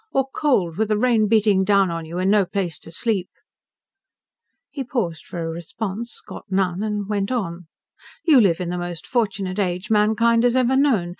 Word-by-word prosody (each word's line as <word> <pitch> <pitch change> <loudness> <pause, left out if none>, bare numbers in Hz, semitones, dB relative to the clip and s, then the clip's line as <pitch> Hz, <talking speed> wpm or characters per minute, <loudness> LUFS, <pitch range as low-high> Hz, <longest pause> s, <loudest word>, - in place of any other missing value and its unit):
Or 270 -1 +1
cold, 190 - +1
with 220 +1 +1
the 215 0 +1
rain 225 -2 +3
beating 205 -3 +3
down 195 -2 +3
on 165 -1 -4
you, 165 +2 -7
and 185 +2 +1
no 210 -1 +4
place 175 -6 -3
to 165 - -12
sleep?" 195 0 -1 1.4
He 275 - -4
paused 220 - -3
for 170 - -5
a - - -3
response, 195 +7 -6
got - - -10
none 190 -1 0
and 210 -2 -2
went 200 0 -1
on. 180 -8 -3 0.6
"You 295 -7 +6
live 180 -6 +2
in 180 -2 -3
the 180 0 -3
most 175 -1 -6
fortunate 200 -5 -1
age 185 +1 -2
mankind 220 +2 +3
has 245 0 +3
ever 255 0 +3
known. 255 -11 +2
200 Hz, 190 wpm, -22 LUFS, 180-230 Hz, 1.4 s, You